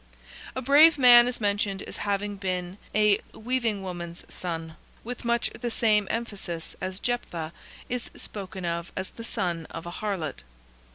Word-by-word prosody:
A 260 - -3
brave 295 +5 +7
man 245 -2 +9
is 250 - -2
mentioned 200 -2 0
as - - -5
having 205 0 -1
been 185 -1 -3 0.2
a 210 -1 +5
"weaving 225 -4 -1
woman's 175 -2 -6
son," 165 -2 -4 0.3
with 245 +2 -6
much 235 0 +1
the 240 - -4
same 215 -3 +3
emphasis 200 -8 -4
as 185 +1 -3
Jeptha 170 -10 -2 0.3
is 245 -1 -3
spoken 190 -3 -6
of 170 0 -2
as 190 0 -4
the 230 - -9
son 170 -7 -2
of 165 - -7
an 175 - -5
Harlot. 175 - -3
200 Hz, 155 wpm, -27 LUFS, 175-235 Hz, 0.3 s, man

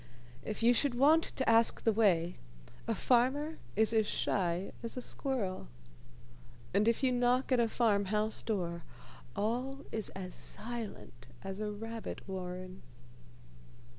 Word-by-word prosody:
If 215 +1 -4
you 240 +1 +6
should 255 +1 +2
want 305 +6 +5
to 265 - -3
ask 225 0 +5
the 225 - +4
way, 180 -6 +2 0.5
a 225 - +1
farmer 265 - +2 0.2
is 220 +2 +3
as 220 -2 +3
shy 180 -2 0
as 230 +2 -5
a - - 0
squirrel, 240 - -3 1.1
and 205 +3 +3
if 230 +4 +2
you 260 - +4
knock 245 +2 +2
at 255 - +4
a 230 -1 +2
farm 210 -4 +2
house 210 +2 0
door, 175 -6 -2 0.5
all 250 +6 -2
is 220 -3 -2
as 185 -1 -6
silent 215 - -4 0.2
as 195 +1 -5
a 210 -1 -2
rabbit 225 +1 -6
warren. 185 0 -6
220 Hz, 140 wpm, -33 LUFS, 195-245 Hz, 1.1 s, you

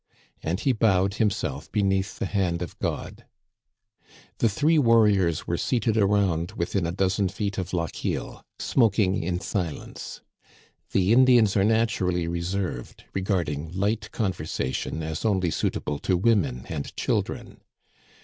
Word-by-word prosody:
And 85 +4 -2
he. 135 - +2
bowed 100 -5 +2
himself 110 -3 -1
be 105 - +1
neath 95 0 0
the 115 - -2
hand 90 -4 0
of 85 - -8
God. - - -4 1.2
The 115 - +3
three 150 +9 +3
warriors 105 - +3
were 85 - -2
seated 115 -3 +1
around 100 -4 +2
within 85 -2 -1
a - - -2
dozen 95 +1 +1
feet 100 0 -3
of 95 -1 -4
Lochiel, 85 -4 -3 0.2
smoking 105 -5 +2
in 90 +1 -2
silence. 90 -5 -5 0.7
The 95 +3 +3
Indians 120 -5 +5
are 100 - +4
naturally 100 -6 +1
reserved, 85 -5 -3
regarding 85 -5 -2
light 105 +2 -1
conversation 80 - -2
as 80 0 -4
only 95 -6 +1
suitable 75 -2 -2
to 90 +3 +1
women 85 - +1
and 75 -3 -5
children. - - -2
95 Hz, 130 wpm, -25 LUFS, 85-105 Hz, 1.2 s, Indians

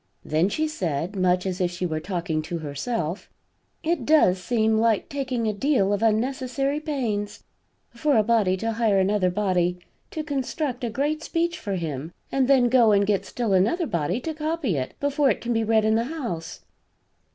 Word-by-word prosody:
Then 160 +5 +2
she 315 +9 0
said, 180 - -3
much 180 -1 +2
as 185 -1 -2
if 180 - +2
she 180 +1 -4
were 155 -2 -2
talking 170 -2 -2
to 170 +2 -4
herself: 160 - -4 0.5
"It 320 -4 0
does 230 -11 +4
seem 220 0 +1
like 225 -2 +1
taking 260 -4 -2
a 215 - 0
deal 205 -4 +1
of 205 - -1
unnecessary 255 +5 0
pains, 240 -10 -3 0.5
for 275 +3 +1
a 215 - +4
body 210 -4 +2
to 225 +4 -2
hire 220 -3 +2
another 190 -1 +2
body 180 -2 0 0.3
to 310 - -4
construct 275 -2 -3
a 240 - 0
great 290 +6 -1
speech 340 +2 -1
for 200 -3 -3
him 160 -3 -4 0.2
and 265 -2 +2
then 260 -3 +5
go 240 -3 +5
and 200 0 +4
get 200 -1 0
still 235 -5 -1
another 225 - +2
body 170 - -1
to 320 - -3
copy 305 - -1
it 130 -2 -3
before 285 0 +2
it 210 - 0
can 240 0 -2
be 225 0 +1
read 220 0 +2
in 220 - +3
the 230 +1 +1
House." 240 - -5
220 Hz, 185 wpm, -24 LUFS, 185-270 Hz, 0.5 s, then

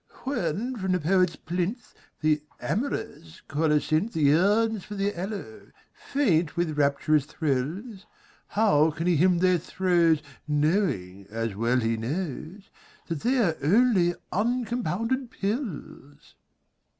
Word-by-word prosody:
When 240 - -2
from 190 -2 -1
the 180 - +1
poet's 180 +1 +2
plinth 185 - -4 0.3
The 155 -1 +2 0.2
amorous 165 - -4
colocynth 155 +6 +1
Yearns 195 +8 +3
for 210 - -8
the 200 +1 -1
aloe, 205 +4 -6 0.3
faint 175 - 0
with 170 -3 0
rapturous 145 0 +2
thrills, 165 - -3 0.5
How 160 -8 +4
can 160 +2 -4
he 175 -3 +3
hymn 180 +3 +4
their 180 0 +3
throes 170 -3 +2 0.2
Knowing, 145 - 0
as 115 0 -3
well 120 +4 +1
he 115 -1 0
knows, 160 - -5 0.4
That 165 -3 -2
they 255 - +1
are 185 -10 +2
only 185 - +3 0.2
uncompounded 235 - -1
pills? 195 - -5
175 Hz, 115 wpm, -26 LUFS, 150-210 Hz, 0.5 s, How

